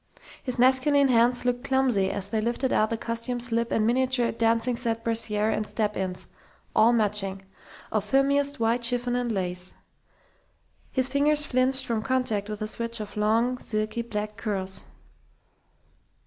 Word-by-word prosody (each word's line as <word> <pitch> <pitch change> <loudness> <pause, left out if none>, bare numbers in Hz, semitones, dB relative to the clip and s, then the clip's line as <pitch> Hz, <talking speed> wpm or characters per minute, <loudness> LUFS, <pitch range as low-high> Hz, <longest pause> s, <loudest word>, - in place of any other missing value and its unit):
His 255 -2 -1
masculine 265 +3 +4
hands 245 +1 +3
looked 245 0 0
clumsy 260 -8 +1
as 195 -1 -4
they 220 0 -1
lifted 240 +3 -1
out 215 - +2
the 230 - -2
costume 230 +2 -3
slip 235 -1 -1
and 215 - +1
miniature 250 0 +1
"dancing 230 +2 +1
set" 230 -1 -1
brassiere 220 -2 +1
and 215 0 -2
step 210 -2 -2
ins 185 -1 -4 0.5
all 225 +2 +5
matching, 205 -4 +1 0.5
of 215 -2 0
filmiest 280 +4 +1
white 230 +1 +1
chiffon 245 0 0
and 245 -1 -1
lace. 180 -2 -1 1.2
His 260 -1 +1
fingers 295 +2 +2
flinched 260 0 +1
from 230 -2 -1
contact 225 -5 -1
with 210 0 -6
the 215 - -2
switch 230 +1 -2
of 210 -1 -7
long, 230 +4 +1
silky 215 +1 -2
black 210 -2 -5
curls.... 195 -4 -3
230 Hz, 150 wpm, -26 LUFS, 215-255 Hz, 1.2 s, all